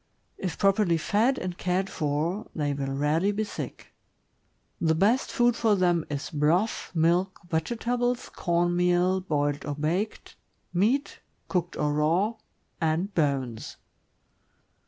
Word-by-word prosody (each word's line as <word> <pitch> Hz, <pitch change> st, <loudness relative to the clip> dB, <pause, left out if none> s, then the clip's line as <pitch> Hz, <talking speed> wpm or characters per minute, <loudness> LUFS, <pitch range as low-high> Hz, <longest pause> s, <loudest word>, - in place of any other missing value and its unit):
If 185 Hz, -3 st, -3 dB
prop 195 Hz, 0 st, +3 dB
erly 175 Hz, -6 st, +2 dB
fed 225 Hz, +10 st, +2 dB
and 180 Hz, -1 st, -4 dB
cared 185 Hz, +1 st, 0 dB
for, 160 Hz, +5 st, -2 dB
they 145 Hz, -3 st, 0 dB
will 140 Hz, -1 st, -3 dB
rarely 150 Hz, +8 st, +1 dB
be 210 Hz, +1 st, -1 dB
sick. 210 Hz, -, -7 dB, 0.9 s
The 160 Hz, -1 st, +2 dB
best 210 Hz, +10 st, +2 dB
food 240 Hz, -1 st, +3 dB
for 220 Hz, -3 st, +3 dB
them 175 Hz, -3 st, +2 dB
is 145 Hz, +2 st, -4 dB
broth, 165 Hz, +8 st, +1 dB
milk, 175 Hz, +4 st, +2 dB
vegetables, 240 Hz, +8 st, -1 dB
corn 175 Hz, 0 st, 0 dB
meal, 180 Hz, +1 st, +2 dB
boiled 145 Hz, -4 st, -1 dB
or 145 Hz, -, -3 dB
baked, 170 Hz, +9 st, -2 dB, 0.4 s
meat, 225 Hz, +11 st, +1 dB, 0.3 s
cooked 175 Hz, -2 st, -1 dB
or 150 Hz, -1 st, +1 dB
raw, 165 Hz, +9 st, +2 dB, 0.5 s
and 165 Hz, +5 st, 0 dB
bones. 135 Hz, -7 st, -1 dB
175 Hz, 130 wpm, -27 LUFS, 155-200 Hz, 0.9 s, prop